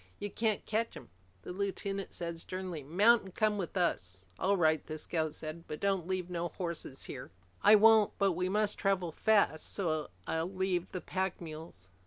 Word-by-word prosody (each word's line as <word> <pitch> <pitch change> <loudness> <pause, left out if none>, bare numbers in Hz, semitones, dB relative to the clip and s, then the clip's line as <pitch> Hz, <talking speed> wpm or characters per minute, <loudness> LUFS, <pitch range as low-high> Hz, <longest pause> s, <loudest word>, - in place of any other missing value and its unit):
"You 205 - -5
can't 220 -2 0
catch 225 +2 -1
'em." - - -12 0.3
The - - -6
lieutenant 195 0 -3
said 170 -1 -4
sternly, 185 -2 -5
"Mount 205 - +5
and 190 -2 -12
come 215 -1 +2
with 185 +1 -3
us." 95 - 0 0.2
"All 195 +1 +2
right," 160 -3 +3
the 155 - -4
scout 155 -1 -2
said. 160 +2 -6
"But 150 - -5
don't 195 -4 0
leave 185 -2 -1
no 175 -1 -2
horses 170 -5 -5
here!" 125 - -7 0.3
"I 215 - +8
won't. 220 0 +6
But 200 -1 +3
we 180 +1 -1
must 210 +1 +1
travel 190 -4 +1
fast 200 -5 +2
so 155 -6 -1 0.2
I'll 160 +3 -1
leave 185 -2 -1
the 185 - -4
pack 190 -1 -2
mules." 155 - -9
180 Hz, 185 wpm, -32 LUFS, 160-200 Hz, 0.3 s, I